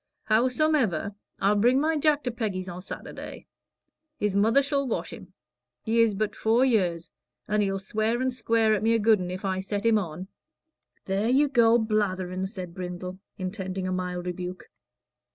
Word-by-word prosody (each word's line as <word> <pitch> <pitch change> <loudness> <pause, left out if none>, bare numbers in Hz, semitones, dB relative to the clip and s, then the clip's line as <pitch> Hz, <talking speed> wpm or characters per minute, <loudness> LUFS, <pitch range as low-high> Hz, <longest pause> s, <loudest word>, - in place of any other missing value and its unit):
Howsomever, 235 - +1 0.3
I'll 200 +2 +3
bring 245 +5 +4
my 315 +2 +1
Jack 300 -1 +2
to 245 - -1
Peggy's 205 -6 -3
o' 175 0 -6
Saturday. 185 - -8 0.7
His 205 -2 -1
mother 225 +7 +4
shall 280 -1 0
wash 235 - -3
him. - - -12 0.5
He 230 +1 +2
is 225 -3 +3
but 210 +1 -2
four 230 +4 +3
year 205 -9 +3
old, 170 +1 -11 0.4
and 210 0 +1
he'll 195 -1 0
swear 215 +4 -1
and 260 0 0
square 230 -3 +2
at 210 - 0
me 225 +1 +3
a - - +2
good 215 -1 +4
un, 180 -1 -4
if 185 +2 -5
I 190 -1 0
set 200 +2 -3
him 225 -2 +4
on." 180 0 -6 0.8
"There 195 +4 0
you 280 +4 +4
go 235 -4 +5
blatherin'," 190 -4 -1
said 185 -4 -7
Brindle, 180 0 -6 0.2
intending 185 0 -4
a - - -2
mild 180 -1 -3
rebuke. 180 0 -6
210 Hz, 175 wpm, -26 LUFS, 185-230 Hz, 0.8 s, go